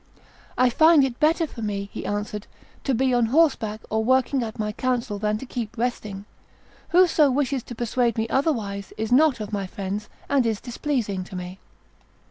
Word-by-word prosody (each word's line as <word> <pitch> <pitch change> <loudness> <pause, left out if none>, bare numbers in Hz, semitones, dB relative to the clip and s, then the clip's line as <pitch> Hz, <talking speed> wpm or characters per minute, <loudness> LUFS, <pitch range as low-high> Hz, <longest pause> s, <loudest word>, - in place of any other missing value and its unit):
"I 250 -1 +4
find 315 +2 +6
it 255 -3 -2
better 320 +2 +3
for 250 -6 -9
me," 200 -2 -3
he - - -5
answered, 210 0 -3 0.4
"to 270 - +2
be 260 +2 +2
on 240 -2 +3
horseback, 230 -6 +2
or 220 0 +1
working 260 +2 +2
at 225 -1 -5
my 210 -1 -2
council, 240 -2 -2
than 210 0 0
to 265 - -8
keep 240 -2 -5
resting. 210 -4 -3 0.6
Whoso 340 -5 +5
wishes 270 0 0
to 240 - -9
persuade 235 0 0
me 220 0 0
otherwise 225 -8 -1
is 220 +1 -3
not 280 0 +4
of 215 0 -6
my 200 -2 -2
friends, 200 +2 -5 0.2
and 280 -2 +3
is 225 -3 0
displeasing 240 -7 -2
to 190 - -10
me." 180 +1 -6
235 Hz, 180 wpm, -24 LUFS, 210-265 Hz, 0.6 s, find